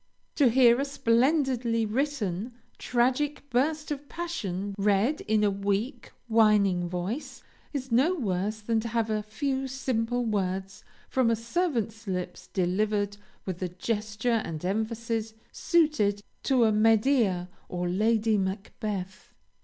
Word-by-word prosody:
To 275 -5 +4
hear 240 +1 +5
a - - 0
splendidly 250 -3 +2
written, 230 -4 -2 0.3
tragic 260 +4 0
burst 300 +5 0
of 285 0 -5
passion 205 - -4
read 205 +8 +2
in 215 0 +3
a 205 - +3
weak, 205 +6 -2 0.2
whining 210 -6 +3
voice, 185 - -4 0.3
is 265 -3 -4
no 275 +10 +4
worse 210 - -2
than 225 +1 +1
to 225 - -3
have 225 -1 0
a 215 0 0
few 265 +5 -2
simple 245 -2 -1
words 195 -2 -2 0.2
from 255 -3 +2
a 230 - +3
servant's 230 - -2
lips 180 -1 -4
delivered 205 +2 0 0.3
with 185 -2 -4
the 185 - -2
gesture 215 +4 -1
and 160 +1 -5
emphasis 220 +2 -2 0.2
suited 260 - +2 0.2
to 260 -3 +3
a 220 - +4
Medea 215 -3 +3 0.2
or 180 0 -2
Lady 215 +3 +2
Macbeth. 195 0 -4
220 Hz, 130 wpm, -28 LUFS, 200-255 Hz, 0.3 s, hear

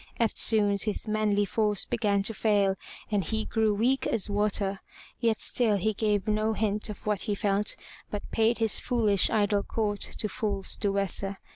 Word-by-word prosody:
Eftsoons 210 -3 +3
his 215 +1 -3
manly 210 -1 +1
force 210 +1 0
began 200 -3 0
to 225 - +2
fail 200 -2 +2 0.4
and 205 -2 +1
he 220 +6 -2
grew 220 -1 +1
weak 250 +6 +1
as 210 -2 -1
water. 200 -1 0 0.4
Yet 230 -2 +1
still 225 -5 +2
he 215 +3 0
gave 210 0 0
no 215 +1 +1
hint 210 0 -1
of 210 - -9
what 210 -2 0
he 210 -3 -1
felt 200 +1 0 0.3
but 205 - -6
paid 225 +1 +2
his 225 -2 +1
foolish 215 -5 +3
idle 205 -2 +1
court 205 -1 -2
to 215 - 0
false 200 -2 -3
Duessa. 200 -1 -1
210 Hz, 165 wpm, -27 LUFS, 200-220 Hz, 0.4 s, Eftsoons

